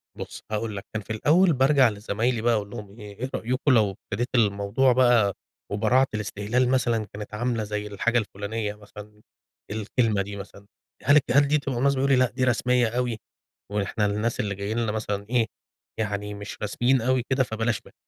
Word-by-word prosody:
بُص -, -, -8 dB
هاقول 110 Hz, 0 st, -2 dB
لك 100 Hz, -, -7 dB
كان 110 Hz, -, -2 dB
في -, -, -20 dB
الأوّل 165 Hz, -, +4 dB
بارجع 135 Hz, -1 st, +4 dB
لزمايلي 110 Hz, +3 st, -1 dB
بقى 120 Hz, +1 st, +3 dB
أقول 105 Hz, -2 st, -1 dB
لهم 100 Hz, +1 st, -9 dB
إيه، 105 Hz, +5 st, -6 dB
رأيكم 130 Hz, +5 st, 0 dB
لو 110 Hz, -5 st, +4 dB
ابتديت 105 Hz, +4 st, -4 dB
الموضوع 105 Hz, +3 st, +3 dB
بقى 120 Hz, -5 st, +4 dB, 0.4 s
وبراعة 115 Hz, +6 st, +3 dB
الاستهلال 110 Hz, +4 st, 0 dB
مثلًا 120 Hz, -4 st, +1 dB
كانت 105 Hz, 0 st, -8 dB
عاملة 115 Hz, 0 st, -1 dB
زي 105 Hz, 0 st, -4 dB
الحاجة 120 Hz, +4 st, 0 dB
الفلانية 105 Hz, 0 st, -3 dB
مثلًا 105 Hz, 0 st, -13 dB, 0.5 s
الكلمة 110 Hz, 0 st, 0 dB
دي 100 Hz, +1 st, -6 dB
مثلًا، 100 Hz, 0 st, -10 dB, 0.4 s
هل 145 Hz, -, +5 dB
الك 150 Hz, -, +6 dB
هل 140 Hz, +2 st, +5 dB
دي 150 Hz, +2 st, +3 dB
تبقى 135 Hz, -4 st, -3 dB
مناسبة؟ 140 Hz, +1 st, +2 dB
يقولوا 135 Hz, 0 st, +4 dB
لي 130 Hz, -, +5 dB
لأ، -, -, -5 dB
دي 130 Hz, 0 st, -2 dB
رسميّة 125 Hz, 0 st, +2 dB
أوي، 120 Hz, -1 st, -1 dB, 0.5 s
وإحنا 105 Hz, +1 st, 0 dB
الناس 105 Hz, +3 st, -1 dB
اللي 100 Hz, -2 st, -1 dB
جايين 100 Hz, +3 st, -3 dB
لنا 115 Hz, -2 st, 0 dB
مثلًا 105 Hz, -2 st, -3 dB
إيه 120 Hz, -2 st, +3 dB, 0.5 s
يعني 105 Hz, -1 st, -2 dB
مش 105 Hz, 0 st, -8 dB
رسميين 120 Hz, +5 st, +2 dB
أوي 130 Hz, +1 st, +1 dB
كده 130 Hz, 0 st, +3 dB
فبلاش 115 Hz, -1 st, -1 dB
منها. -, -, -17 dB
110 Hz, 185 wpm, -25 LUFS, 105-125 Hz, 0.5 s, الك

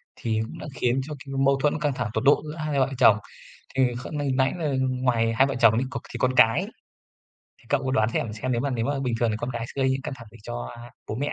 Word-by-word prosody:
thì 110 Hz, -1 st, -1 dB
cũng -, -, -10 dB
đã -, -, -7 dB
khiến 125 Hz, +2 st, +1 dB
cho 155 Hz, -, -5 dB
cái 135 Hz, -, -7 dB
mâu 135 Hz, 0 st, +4 dB
thuẫn 150 Hz, +3 st, +1 dB
căng 145 Hz, -2 st, 0 dB
thẳng 120 Hz, -3 st, -3 dB
tột 110 Hz, -, -1 dB
độ 145 Hz, -, +5 dB
giữa 150 Hz, 0 st, -6 dB
hai 155 Hz, -3 st, -1 dB
vợ 130 Hz, 0 st, +3 dB
chồng. 115 Hz, -5 st, +7 dB, 0.6 s
Thì 135 Hz, -, +4 dB, 0.2 s
kh -, -, -7 dB
nãy 135 Hz, -2 st, +1 dB
là 155 Hz, -5 st, -1 dB
ngoài 125 Hz, -3 st, +1 dB
hai 130 Hz, +4 st, +4 dB
vợ 135 Hz, -, -2 dB
chồng 115 Hz, -2 st, +6 dB
thì 130 Hz, -, -1 dB
có -, -, -3 dB
thì -, -, -4 dB
con 130 Hz, 0 st, +2 dB
cái. 115 Hz, -3 st, +5 dB, 0.9 s
Thì -, -, -24 dB
cậu 135 Hz, -, +1 dB
có 130 Hz, -, 0 dB
đoán 110 Hz, -4 st, +2 dB
xem- 110 Hz, -, -1 dB
xem 120 Hz, +4 st, -3 dB
nếu 120 Hz, -, 0 dB
mà 140 Hz, -, -1 dB
nếu 120 Hz, -3 st, -1 dB
mà 145 Hz, 0 st, -1 dB
bình 125 Hz, -3 st, -1 dB
thường 120 Hz, -2 st, +2 dB
thì 105 Hz, -, -1 dB
con 120 Hz, +2 st, -3 dB
cái 115 Hz, -1 st, -3 dB
sẽ 135 Hz, -, -3 dB
gây 130 Hz, -, +3 dB
những 135 Hz, 0 st, -1 dB
căng 135 Hz, -, -4 dB
thẳng 115 Hz, -2 st, -12 dB
gì 115 Hz, -, -14 dB
cho -, -, -5 dB, 0.4 s
bố -, -, -3 dB
mẹ? 145 Hz, +4 st, -2 dB
130 Hz, 280 wpm, -25 LUFS, 115-140 Hz, 0.9 s, chồng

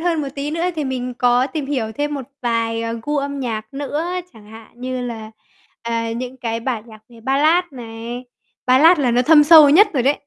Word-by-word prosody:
hơn 330 Hz, -2 st, 0 dB
một 280 Hz, -, -4 dB
tí 285 Hz, +1 st, -4 dB
nữa 330 Hz, +3 st, -2 dB
thì 300 Hz, -, -2 dB
mình 250 Hz, -1 st, -4 dB
có 245 Hz, +1 st, +2 dB
tìm 285 Hz, 0 st, -5 dB
hiểu 240 Hz, -6 st, -2 dB
thêm 290 Hz, +2 st, -3 dB
một 275 Hz, -, -4 dB, 0.2 s
vài, 230 Hz, -1 st, -1 dB
ờ, 230 Hz, 0 st, -3 dB
gu 295 Hz, +3 st, -2 dB
âm 280 Hz, 0 st, -3 dB
nhạc 220 Hz, -1 st, -5 dB
nữa. 290 Hz, +3 st, -3 dB, 0.3 s
Chẳng 215 Hz, -3 st, -17 dB
hạn 220 Hz, 0 st, -13 dB
như 255 Hz, 0 st, -4 dB
là, 225 Hz, -3 st, -6 dB, 0.5 s
à, 230 Hz, -1 st, -2 dB
những 250 Hz, +2 st, -6 dB
cái 230 Hz, -2 st, -4 dB
bản 235 Hz, -3 st, -3 dB
nhạc 220 Hz, -2 st, -15 dB
về 235 Hz, -2 st, -16 dB
Ballad 300 Hz, +8 st, +2 dB
này, 235 Hz, 0 st, -8 dB, 0.4 s
Ballad 305 Hz, +7 st, +6 dB
là 255 Hz, -4 st, +1 dB
nó 245 Hz, +1 st, +2 dB
thâm 295 Hz, +2 st, +6 dB
sâu 305 Hz, -2 st, +8 dB
nhất 405 Hz, +7 st, +6 dB
rồi 260 Hz, -4 st, 0 dB
đấy. 275 Hz, -, +3 dB
255 Hz, 215 wpm, -19 LUFS, 230-290 Hz, 0.5 s, sâu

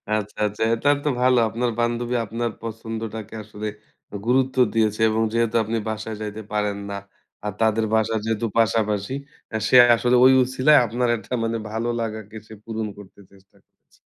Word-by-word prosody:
আচ্ছা, 105 Hz, -1 st, -4 dB
আচ্ছা। 105 Hz, +2 st, -3 dB
এটা 115 Hz, +5 st, +1 dB
তো 150 Hz, -, +1 dB
ভালো। 125 Hz, 0 st, +4 dB
আপনার 120 Hz, +2 st, -1 dB
বান্ধবী 120 Hz, +1 st, 0 dB
আপনার 115 Hz, +2 st, -3 dB
পছন্দটাকে 115 Hz, -1 st, -6 dB
আসলে 105 Hz, 0 st, -7 dB, 0.6 s
গুরুত্ব 130 Hz, +2 st, +2 dB, 0.2 s
দিয়েছে 110 Hz, -1 st, +1 dB
এবং 110 Hz, +1 st, 0 dB
যেহেতু 115 Hz, -1 st, +1 dB
আপনি 110 Hz, +2 st, -2 dB
বাসায় 110 Hz, 0 st, -5 dB
যাইতে 105 Hz, 0 st, -5 dB
পারেন 105 Hz, -1 st, 0 dB
না। 100 Hz, -, -4 dB, 0.5 s
আর 105 Hz, -, -2 dB
তাদের 110 Hz, 0 st, +2 dB
বাসার 110 Hz, 0 st, +1 dB
যেহেতু 115 Hz, +1 st, -1 dB
পাশাপাশি 105 Hz, 0 st, +1 dB, 0.4 s
আ -, -, +2 dB
সে -, -, +2 dB, 0.2 s
আসলে 125 Hz, +2 st, +2 dB
ওই 130 Hz, -, +7 dB
উছিলায় 130 Hz, +4 st, +4 dB
আপনার 120 Hz, +2 st, -1 dB
একটা 110 Hz, -, -9 dB
মানে 115 Hz, 0 st, -1 dB
ভালো 115 Hz, +2 st, -2 dB
লাগাকে 110 Hz, -1 st, -5 dB
সে -, -, -11 dB
পূরণ 110 Hz, -1 st, -4 dB
করতে 100 Hz, -1 st, -14 dB
চেষ্টা 95 Hz, 0 st, -23 dB
করেছে। -, -, -33 dB
110 Hz, 165 wpm, -23 LUFS, 105-120 Hz, 0.6 s, ওই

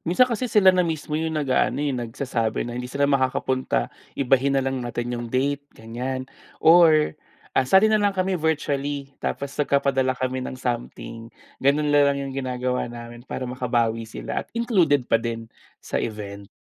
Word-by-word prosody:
minsan 180 Hz, +9 st, +4 dB
kasi 250 Hz, 0 st, -2 dB
sila 195 Hz, -3 st, +6 dB
na 185 Hz, -, +2 dB
mismo 160 Hz, -3 st, -2 dB
yung 160 Hz, +1 st, -1 dB
nag-aano, 140 Hz, -4 st, +1 dB
eh, 140 Hz, -, 0 dB
nag-sasabi 120 Hz, -1 st, -2 dB
na 120 Hz, -, -5 dB
hindi 125 Hz, +1 st, -5 dB
sila 140 Hz, +2 st, 0 dB
makakapunta. 130 Hz, -, 0 dB, 0.2 s
Ibahin 135 Hz, +1 st, +2 dB
na 135 Hz, -, +1 dB
lang 135 Hz, -1 st, -1 dB
natin 120 Hz, 0 st, -3 dB
yung 120 Hz, -1 st, -4 dB
date 140 Hz, +3 st, 0 dB, 0.2 s
ganiyan 125 Hz, +4 st, -4 dB, 0.3 s
or, 160 Hz, -2 st, +6 dB, 0.4 s
ah, 130 Hz, -, +1 dB
sali 210 Hz, +6 st, +6 dB
na 215 Hz, -, +4 dB
lang 200 Hz, -2 st, +1 dB
kami 190 Hz, +1 st, +1 dB
virtually, 145 Hz, -3 st, -1 dB
tapos 140 Hz, 0 st, -3 dB
nagpapadala 135 Hz, -2 st, +1 dB
kami 130 Hz, 0 st, -2 dB
ng 130 Hz, -, -5 dB
something, 120 Hz, -2 st, -5 dB, 0.3 s
ganun 145 Hz, +2 st, +2 dB
na 145 Hz, -1 st, +5 dB
lang 140 Hz, -, +1 dB
yung 140 Hz, -1 st, -4 dB
ginagawa 125 Hz, -2 st, -2 dB
namin 120 Hz, +1 st, -10 dB
para 130 Hz, -, -4 dB
makabawi 120 Hz, -3 st, -1 dB
sila -, -, -4 dB
at -, -, -12 dB
included 175 Hz, -, +3 dB
pa 115 Hz, -2 st, +2 dB
din 115 Hz, -1 st, -4 dB, 0.3 s
sa -, -, -3 dB
event. 100 Hz, -2 st, -6 dB
135 Hz, 170 wpm, -24 LUFS, 120-150 Hz, 0.4 s, sila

